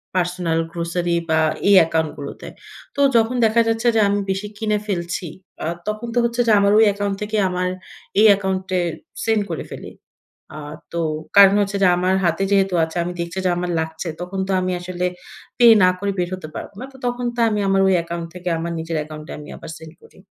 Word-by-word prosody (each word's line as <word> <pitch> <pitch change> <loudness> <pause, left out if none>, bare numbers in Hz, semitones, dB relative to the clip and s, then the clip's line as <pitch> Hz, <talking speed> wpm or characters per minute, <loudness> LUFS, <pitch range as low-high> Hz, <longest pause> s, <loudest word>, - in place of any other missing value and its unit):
personal 175 -2 0
grocery 170 0 -1
বা, 160 0 +3 0.3
এই 200 - +7
অ্যাকাউন্টগুলোতে। 160 -3 -2 0.5
তো - - -6 0.2
যখন 230 +2 +3
দেখা 225 +1 +3
যাচ্ছে 225 +1 0
যে, 220 - +4
আমি 200 +1 +1
বেশি 195 +2 -2
কিনে 215 -1 0
ফেলছি, 175 -2 -3 0.4
আ - - -2 0.2
তখন 215 +2 -3
তো - - -3
হচ্ছে 235 +1 0
যে, - - +5
আমার 200 0 +3
ওই 220 - +7
অ্যাকাউন্ট 200 0 -2
থেকে 215 +1 -2
আমার 180 0 -1 0.5
এই 215 - +6
অ্যাকাউন্টে 190 -1 0 0.4
সেন্ড 220 -1 +2
করে 165 - -3
ফেলি। - - -8 0.7
আ - - -6 0.3
তো 170 - -2 0.4
কারণ 200 0 +8
হচ্ছে 200 0 -1
যে, 185 - +6
আমার 185 +1 +1
হাতে 170 +3 +1
যেহেতু 195 -2 +3
আছে, 160 +1 -4
আমি 175 - -4
দেখছি 170 +2 -4
যে, 185 - +3
আমার 175 0 -2
লাগছে। 160 +2 -4
তখন 185 +2 -5
তো - - -2
আমি 185 0 -1
আসলে 180 0 -4 0.5
পে 245 - +5 0.2
না 185 - +6
করে 200 0 -1
বের 175 -1 0
হতে 185 -4 -6
পারবো - - -7
না। 260 - -5
তো 265 - -14
তখন 245 0 -2
তো - - -5
আমি 210 -1 -1
আমার 195 0 +3
ওই 190 - +4
অ্যাকাউন্ট 170 0 -4
থেকে 180 0 -4
আমার 170 +1 -3
নিজের 165 0 -4
অ্যাকাউন্টে 155 0 -7
আমি 150 0 -10
আবার - - -10
সেন্ড 160 -1 -12
করি। - - -19
185 Hz, 205 wpm, -21 LUFS, 170-205 Hz, 0.7 s, কারণ